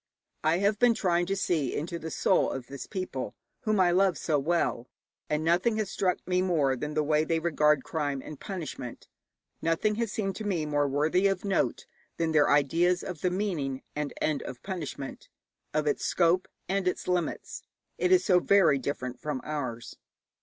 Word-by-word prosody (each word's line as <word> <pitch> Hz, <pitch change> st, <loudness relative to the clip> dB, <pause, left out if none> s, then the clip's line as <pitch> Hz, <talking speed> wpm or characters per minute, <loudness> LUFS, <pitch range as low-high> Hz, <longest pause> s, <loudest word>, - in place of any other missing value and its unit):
I 160 Hz, +2 st, +3 dB
have 200 Hz, +2 st, +1 dB
been 245 Hz, -2 st, +5 dB
trying 175 Hz, -4 st, +1 dB
to 195 Hz, -, 0 dB
see 170 Hz, -9 st, 0 dB
into 170 Hz, +3 st, -3 dB
the 160 Hz, -, -5 dB
soul -, -, +2 dB
of 130 Hz, -, -5 dB
this 135 Hz, -1 st, -8 dB
people 180 Hz, -, -4 dB, 0.3 s
whom 215 Hz, -2 st, +2 dB
I 180 Hz, -2 st, +5 dB
love 185 Hz, -1 st, +3 dB
so 150 Hz, -3 st, +1 dB
well, 140 Hz, -5 st, 0 dB, 0.4 s
and 150 Hz, +1 st, 0 dB
nothing 180 Hz, +7 st, +2 dB
has 210 Hz, -3 st, -2 dB
struck 185 Hz, -2 st, -1 dB
me 180 Hz, 0 st, +2 dB
more 155 Hz, -8 st, +2 dB
than 150 Hz, +4 st, -5 dB
the 155 Hz, -, +2 dB
way 150 Hz, +1 st, +2 dB
they 165 Hz, +1 st, 0 dB
regard 150 Hz, -4 st, +2 dB
crime 145 Hz, -4 st, -2 dB
and 155 Hz, -, -8 dB
punishment; 165 Hz, -, -6 dB, 0.5 s
nothing 165 Hz, +6 st, +1 dB
has 230 Hz, -3 st, -1 dB
seemed 195 Hz, -3 st, -2 dB
to 220 Hz, -, -5 dB
me 180 Hz, -7 st, -1 dB
more 145 Hz, -1 st, +1 dB
worthy 155 Hz, +7 st, +2 dB
of 195 Hz, 0 st, -1 dB
note 195 Hz, -1 st, 0 dB, 0.3 s
than 165 Hz, -1 st, 0 dB
their 150 Hz, -2 st, +4 dB
ideas 165 Hz, +5 st, +3 dB
of 180 Hz, -5 st, -6 dB
the 180 Hz, -, +2 dB
meaning 170 Hz, -9 st, -2 dB
and 150 Hz, -1 st, -2 dB
end 150 Hz, -3 st, 0 dB
of 125 Hz, -, -8 dB
punishment, 165 Hz, -8 st, -6 dB, 0.4 s
of 155 Hz, 0 st, 0 dB
its 145 Hz, -, 0 dB
scope 175 Hz, +1 st, +2 dB, 0.2 s
and 195 Hz, -1 st, 0 dB
its 180 Hz, -, -1 dB
limits. 180 Hz, -2 st, -2 dB, 0.4 s
It 365 Hz, -, +2 dB
is 370 Hz, 0 st, +5 dB
so 180 Hz, -3 st, +5 dB
very 175 Hz, -7 st, +4 dB
different 130 Hz, -2 st, -4 dB
from 150 Hz, -2 st, -3 dB
ours. 130 Hz, -6 st, -5 dB
165 Hz, 185 wpm, -28 LUFS, 145-185 Hz, 0.5 s, been